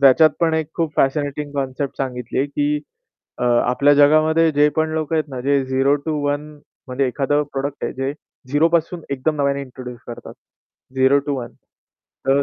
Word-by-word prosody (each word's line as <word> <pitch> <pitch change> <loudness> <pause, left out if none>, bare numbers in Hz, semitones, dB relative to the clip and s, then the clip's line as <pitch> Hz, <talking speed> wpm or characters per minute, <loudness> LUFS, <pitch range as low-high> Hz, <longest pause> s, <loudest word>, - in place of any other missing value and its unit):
त्याच्यात 140 +3 +6
पण 165 -1 +2
एक 160 -2 -1
खूप 165 -3 -1
फॅशनेटिंग 145 +1 0
कन्सेप्ट 135 0 -3
सांगितली, 130 0 -2
की 145 +1 -1 0.6
अ, - - -1
आपल्या 125 +4 +3
जगामध्ये 155 +3 +4
जे 145 0 +4
पण 160 0 +1
लोकं 160 0 -1
आहेत 155 - +1
ना, 130 -2 -6
जे 140 +1 +1
झेरो 135 +2 +2
टु 160 - 0
वन 145 0 0 0.5
म्हणजे 130 +1 0
एखादं 145 +3 +1
प्रॉडक्ट 140 +1 -3
आहे - - -2
जे 135 +1 -2 0.4
झेरोपासून 165 +3 +1
एकदम 140 +3 -1
नव्याने 140 -1 0
इंट्रोड्यूस 125 -2 -9
करतात. 120 - -9 0.6
Zero 130 +2 +5
to 145 - 0
one. 120 - -7 0.7
तर 140 +1 +3
140 Hz, 165 wpm, -20 LUFS, 135-150 Hz, 0.7 s, त्याच्यात